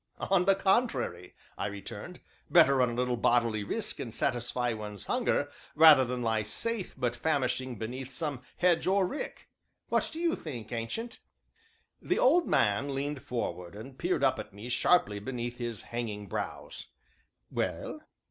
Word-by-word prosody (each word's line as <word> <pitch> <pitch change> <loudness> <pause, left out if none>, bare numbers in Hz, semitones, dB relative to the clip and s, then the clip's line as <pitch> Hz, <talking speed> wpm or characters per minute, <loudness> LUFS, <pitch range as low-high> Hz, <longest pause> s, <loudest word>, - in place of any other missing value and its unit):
"On 185 -2 +2
the 195 0 +5
contrary," 195 - 0 0.2
I - - 0
returned, 100 - -8 0.3
"better 155 -6 +6
run 125 -1 +3
a - - -4
little 125 0 0
bodily 115 -3 +2
risk 215 - -2
and 120 - -4
satisfy 120 0 -1
one's 105 -2 -7
hunger, 235 - 0 0.2
rather 155 -3 +9
than 125 0 -3
lie 110 -1 +1
safe 195 - -2
but 120 -1 0
famishing 130 -3 0
beneath 125 +5 -5
some 145 -3 -2 0.2
hedge 175 -1 +3
or 190 0 +4
rick 275 +11 -5 0.4
what - - +1
do 320 - -6
you 340 -1 +2
think, 120 -9 -7
Ancient?" 120 - -4 0.8
The 365 - 0
old 335 +6 +4
man 135 +7 +2
leaned 140 0 -3
forward 90 -7 -4
and 130 +5 -9
peered - - 0
up - - +3
at - - -7
me 110 +4 -8
sharply 120 -5 +3
beneath 120 +2 -5
his 120 -3 -4
hanging 110 -3 -4
brows. 95 - -5 0.6
"Well?" - - -3
125 Hz, 155 wpm, -30 LUFS, 115-170 Hz, 0.8 s, rather